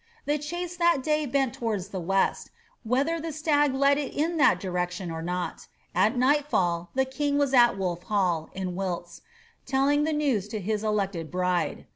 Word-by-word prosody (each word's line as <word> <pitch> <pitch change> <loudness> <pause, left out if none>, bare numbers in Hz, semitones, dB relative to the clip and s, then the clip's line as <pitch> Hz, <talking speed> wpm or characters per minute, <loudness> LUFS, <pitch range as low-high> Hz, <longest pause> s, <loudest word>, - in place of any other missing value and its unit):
The 295 +1 0
chase 345 +4 -5
that 340 -6 +3
day 305 0 +1
bent 270 -1 +1
towards 210 -5 -3
the 190 - -4
west, 190 +3 0 0.3
whether 275 +8 0
the 325 0 -4
stag 295 -2 +2
led 280 +1 +3
it 285 - -4
in 325 +3 0
that 185 - +4
direction 180 -1 -3
or 160 0 -5
not 180 +1 -4 0.3
At 210 +7 +2
nightfall 245 - +1
the 265 0 +2
king 285 +2 -1
was 285 -2 +1
at 240 -5 +5
Wolf 180 -2 -3
HalU 180 -6 0
in 185 -1 -3
Wilts, 175 -2 -4 0.5
telling 280 +2 +2
the 315 - 0
news 270 -10 0
to 215 0 -4
his 210 +2 -2
elected 195 -6 -1
bride. 180 -1 -1
235 Hz, 175 wpm, -27 LUFS, 185-290 Hz, 0.5 s, at